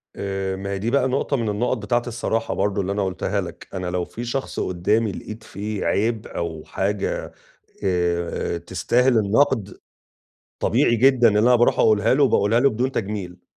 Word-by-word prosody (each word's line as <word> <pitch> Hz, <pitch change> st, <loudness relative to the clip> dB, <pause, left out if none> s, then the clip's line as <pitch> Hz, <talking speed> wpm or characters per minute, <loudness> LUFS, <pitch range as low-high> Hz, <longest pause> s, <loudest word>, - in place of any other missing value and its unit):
آآ، 95 Hz, -1 st, -3 dB
ما 100 Hz, +1 st, -6 dB
هي 100 Hz, -, -2 dB
دي 115 Hz, +4 st, -1 dB
بقى 135 Hz, -1 st, +3 dB
نقطة 135 Hz, +1 st, 0 dB
من 115 Hz, -3 st, -1 dB
النُقَط 120 Hz, +4 st, 0 dB
بتاعة 120 Hz, +3 st, 0 dB
الصراحة 115 Hz, -1 st, -2 dB
برضه 100 Hz, 0 st, 0 dB
اللي 95 Hz, +1 st, -2 dB
أنا 100 Hz, 0 st, 0 dB
قُلتها 95 Hz, -, -2 dB
لك. -, -, -9 dB
أنا 90 Hz, -1 st, -3 dB
لو 90 Hz, 0 st, -1 dB
في 120 Hz, -, -7 dB
شخص 130 Hz, +3 st, -3 dB
قُدّامي 105 Hz, +5 st, 0 dB
لقيت 110 Hz, +4 st, -8 dB
فيه 105 Hz, 0 st, -5 dB
عيب 110 Hz, +1 st, 0 dB
أو 80 Hz, -2 st, -5 dB
حاجة 100 Hz, +1 st, -2 dB, 0.5 s
آآ 85 Hz, -2 st, -1 dB
تستاهل 115 Hz, +8 st, +1 dB
الَنقْد، 110 Hz, 0 st, +1 dB, 0.8 s
طبيعي 120 Hz, -, +3 dB
جدًا 125 Hz, -1 st, +5 dB
إن 105 Hz, -, +1 dB
أنا 120 Hz, +4 st, +5 dB
باروح 120 Hz, -, +3 dB
أقولها 110 Hz, +2 st, +4 dB
له 145 Hz, -, +3 dB
وباقولها 115 Hz, -1 st, +3 dB
له 140 Hz, 0 st, +4 dB
بدون 125 Hz, +4 st, -1 dB
تجميل. 95 Hz, -5 st, -4 dB
105 Hz, 175 wpm, -22 LUFS, 95-120 Hz, 0.8 s, جدًا